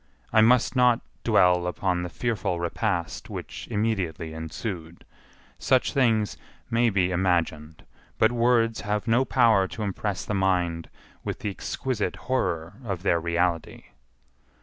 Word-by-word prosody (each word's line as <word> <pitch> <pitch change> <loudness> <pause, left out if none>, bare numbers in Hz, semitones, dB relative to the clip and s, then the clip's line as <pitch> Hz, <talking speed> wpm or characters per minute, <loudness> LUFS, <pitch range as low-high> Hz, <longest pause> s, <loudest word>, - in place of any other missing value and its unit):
I 110 - +6
must 120 +3 +4
not 125 -2 +4 0.2
dwell 90 -1 +4
upon 90 0 -1
the 90 - -4
fearful 110 -5 -2
repast 85 0 -2
which - - -7
immediately 95 -7 -2
ensued. 80 +1 -6 0.5
Such 130 0 +2
things 115 -7 +2 0.3
may 115 +1 +3
be 95 -3 +1
imagined, 85 -4 -1 0.3
but 110 - +4
words 115 -1 +2
have 105 +2 -2
no 120 +3 +3
power 115 -8 +4
to 110 - -6
impress 100 -1 -3
the - - -3
mind 90 -4 0 0.3
with - - -3
the 105 - -3
exquisite 105 0 -3
horror 90 -7 -2
of 95 -6 -4
their 85 -4 +2
reality. 85 0 -1
95 Hz, 130 wpm, -26 LUFS, 85-115 Hz, 0.5 s, I